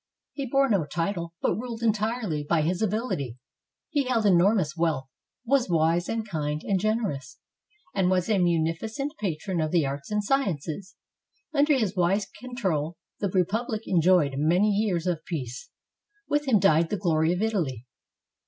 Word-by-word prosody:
He 275 -2 -4
bore 275 +2 +3
no 200 -9 +2
title, 170 +1 -3
but - - +3
ruled 230 +3 -5
entirely 215 -7 0
by 155 +1 +1
his 175 +4 -1
ability. 205 - -1 0.5
He 285 -2 +1
held 235 -4 +1
enormous 180 -3 +3
wealth, 160 -5 0 0.4
was 260 -3 +2
wise 165 +1 +2
and 225 -1 -2
kind 150 -4 -2
and 195 -2 +1
generous, 205 - -2 0.6
and 190 -2 +2
a 185 +3 +2
munificent 175 - 0
patron 180 -2 -2
of 155 - 0
the 165 -2 +2
arts 140 +1 -5
and 210 0 0
sciences. 195 - -1 0.6
Under 290 -1 +4
his 210 -5 -1
wise 190 +3 +2
control, 190 - -2 0.2
the 200 - 0
republic 215 +5 0
enjoyed 175 -5 +3
many 175 +8 +3
years 200 -5 0
of 175 -4 -1
peace. 130 -6 -5 0.6
With 295 0 0
him 240 -5 +5
died 165 -3 +4
the 210 - -1
glory 160 -3 +2
of 180 +4 0
Italy. 160 - -1
185 Hz, 155 wpm, -26 LUFS, 160-220 Hz, 0.6 s, him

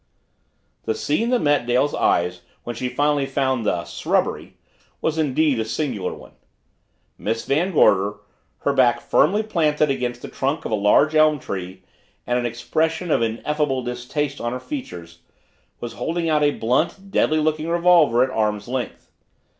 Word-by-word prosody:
The 110 - 0
scene 215 - 0
that 250 -1 +1
met 145 -5 +2
Dale's 125 +4 +2
eyes 90 +1 +1 0.2
when 120 - -5
she 125 +2 -3
finally 145 +2 +1
found 130 -4 0
the 85 -3 0
"srubbery" - - -2 0.5
was 160 0 -1
indeed 150 -3 +2
a - - +1
singular 110 -5 -3
one. - - -12 0.9
Miss 115 +2 -2
Van 165 +7 +1
Gorder, 100 - +3 0.5
her 140 - +1
back 130 -3 +3
firmly 205 +9 +2
planted 155 -8 +1
against 125 -2 -3
the - - -5
trunk 140 +4 -2
of - - -4
a - - +3
large 105 +9 +3
elm 155 -1 +4
tree 95 -6 -6 0.4
and 125 0 0
an 120 - -1
expression 160 +8 -1
of - - +3
ineffable 135 +4 -1
distaste 125 +4 -3
on 120 +1 -2
her 125 - -4
features, 90 - -8 0.6
was 120 -1 -6
holding 165 +6 -2
out 155 -2 +2
a 145 - +4
blunt, 155 - -1
deadly 155 -4 +2
looking 155 0 0
revolver 170 -8 +4
at 130 - -2
arm's 105 -2 -1
length. 125 0 -5
135 Hz, 160 wpm, -22 LUFS, 115-155 Hz, 0.9 s, elm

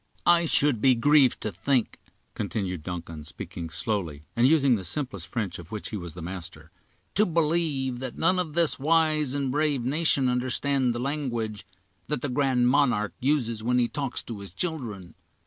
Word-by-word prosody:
"I 170 -1 +5
should 140 -7 +4
be 130 0 +5
grieved 140 +1 +4
to 110 - -3
think," 120 +7 0 0.3
continued 90 -6 -3
Duncan, 85 -2 -7
speaking 80 +2 -7
slowly, 85 -6 -3
and 120 +2 +4
using 140 -3 +4
the 100 -5 -1
simplest 100 - -4
French 105 -9 -3
of 85 -1 -12
which 105 -2 -5
he - - -4
was 85 -4 -7
the 90 - -8
master, 85 -3 -8 0.4
"to 210 - +4
believe 155 - 0
that 130 -2 -6
none 185 0 +2
of 165 -4 -3
this 170 -4 +3
wise 155 -2 +2
and 140 -2 -1
brave 145 -3 +1
nation 140 -1 +3
understand 125 +1 +1
the - - -3
language 120 -6 -3 0.4
that 150 -4 -1
the 145 - -1
'Grand 125 -2 +2
Monarque' 125 -6 +2
uses 125 -5 0
when 125 +2 +1
he 120 -1 +3
talks 140 -1 -3
to 115 -4 -7
his 100 -3 -10
children. 115 - -3
125 Hz, 175 wpm, -26 LUFS, 105-145 Hz, 0.4 s, I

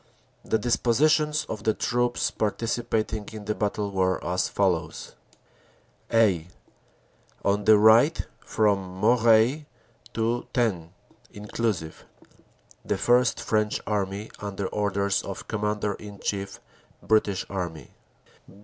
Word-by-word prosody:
The 110 - +1
dispositions 150 +7 +2
of 110 -1 -6
the 110 - +1
troops 120 -1 0
participating 110 -1 -2
in 105 -1 -8
the 105 - -1
battle 105 -1 -2
were 95 -1 +1
as 90 +1 0
follows: 85 -5 -1 1.0
"(a) 100 -8 +3 1.0
On 100 +1 +1
the 110 -1 +7
right 110 +8 +5 0.2
from 105 -2 +1 0.2
Moreuil 115 +5 +4 0.5
to 115 +2 -1
Thennes 100 -10 0 0.4
(inclusive) 105 -5 -3 0.8
The - - -1
First 120 0 +3
French 105 -1 0
Army 100 0 -2
under 100 -1 -4
orders 100 -1 0
of 95 -1 -7
Com 110 -2 -3
mander 105 -1 -1
in 100 0 -10
Chief, 100 -1 -4 0.4
British 105 -3 +1
Army. 85 -8 -5
105 Hz, 110 wpm, -26 LUFS, 100-115 Hz, 1.0 s, the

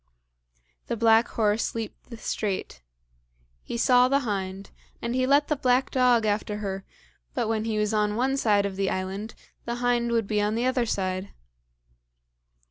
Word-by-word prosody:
The - - -2
black 225 +1 +5
horse 215 0 0
leaped 225 +1 -6
the 235 - -8
strait. 195 - -3 0.8
He - - -5
saw 250 +1 +5
the 275 +2 +2
hind, 195 -4 -4 0.3
and 235 0 -3
he 255 0 +1
let 285 +2 +4
the 300 - +1
black 255 -1 +1
dog 250 -3 +3
after 210 0 -1
her, 195 -2 -4 0.5
but 240 -4 0
when 220 -1 -1
he 220 -1 -1
was 210 0 0
on 210 -1 +1
one 260 +4 +1
side 210 -6 +2
of 195 -1 -4
the 195 -1 +1
island, 190 +4 -4 0.3
the 235 - -2
hind 240 -1 +1
would 230 -2 +1
be 210 +1 0
on 210 +1 0
the 235 +2 0
other 255 -2 +1
side. 185 -1 -2
225 Hz, 170 wpm, -26 LUFS, 205-245 Hz, 0.8 s, black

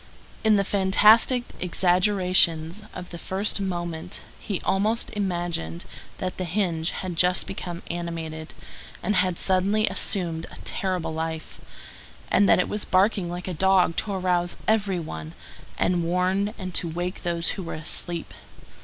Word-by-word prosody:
In 220 -1 +5
the 200 - +3
fantastic 210 +6 +5 0.2
exaggerations 180 -1 +2
of 180 - -9
the 170 - -7
first 200 +3 +1
moment 175 -4 -3 0.2
he 200 -5 -3
almost 215 +4 +1
imagined 175 - -3 0.3
that 185 0 -4
that 185 - -2
hinge 170 -2 0
had 185 -2 -4
just 180 +2 +3
become 175 -2 -6
animated, 165 -2 -5 0.5
and 205 +2 +1
had 185 -2 +1
suddenly 195 +3 +2
assumed 165 -5 0
a - - -12
terrible 185 -6 -2
life, 160 0 -5 0.7
and 200 +1 +4
that - - +7
it 180 - +1
was 210 - -2
barking 190 -1 +2
like 175 +1 -5
a 185 - -2
dog 185 0 +3
to 205 - -1
arouse 180 -2 0
every 200 -4 +2
one, 80 - -7 0.4
and 175 -1 +1
warn 185 +5 0
and 185 -2 -6
to 170 - +4
wake 175 +3 -4
those 170 -2 +2
who 195 - -3
were 170 - -5
asleep. 165 +2 -3
180 Hz, 145 wpm, -25 LUFS, 170-195 Hz, 0.7 s, that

